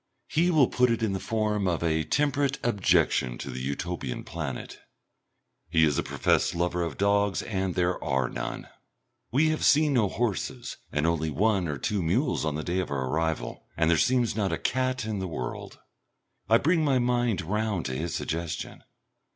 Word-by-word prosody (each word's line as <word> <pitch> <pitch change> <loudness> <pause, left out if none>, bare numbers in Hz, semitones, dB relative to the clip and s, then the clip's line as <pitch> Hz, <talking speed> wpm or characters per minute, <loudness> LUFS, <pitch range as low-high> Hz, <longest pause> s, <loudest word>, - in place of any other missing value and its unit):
He 170 +3 +2
will 155 -7 +5
put 125 0 +2
it 115 -1 0
in 105 -3 +1
the 95 - -2
form 105 -2 0
of 85 -2 0
a 80 -1 +1
temperate 140 - +1
objection 95 - +2
to 70 - -6
the 65 - -5
Utopian 70 0 -3
planet. 75 -6 -6 0.9
He 80 -1 +3
is 75 -3 +3
a - - +3
professed - - +1
lover 90 +1 0
of 85 -2 -3
dogs 100 0 +2
and 95 -4 -2
there 90 0 0
are 65 -2 +1
none. - - -5 0.6
We 150 +6 +3
have 155 - -1
seen 150 -2 +4
no 110 -6 +3
horses 120 +2 -3
and 75 +1 0
only 80 -1 +1
one 95 +3 +1
or 75 -2 -3
two 100 +7 -1
mules 110 - +1
on 75 -2 -1
the 80 - -3
day 90 +3 -1
of 95 - -2
our 65 -2 -2
arrival, 80 -5 -2
and 80 0 +3
there 80 - +4
seems 120 +5 +2
not 100 -3 0
a - - 0
cat 130 -2 -1
in 110 -2 -2
the 95 - -3
world. 65 -8 -6 0.7
I 115 - +7
bring 165 +5 +2
my 140 -3 +3
mind 120 -6 +1
round 105 0 -1
to 65 - -2
his 80 +5 -3
suggestion. 85 +1 -4
95 Hz, 185 wpm, -27 LUFS, 80-120 Hz, 0.9 s, I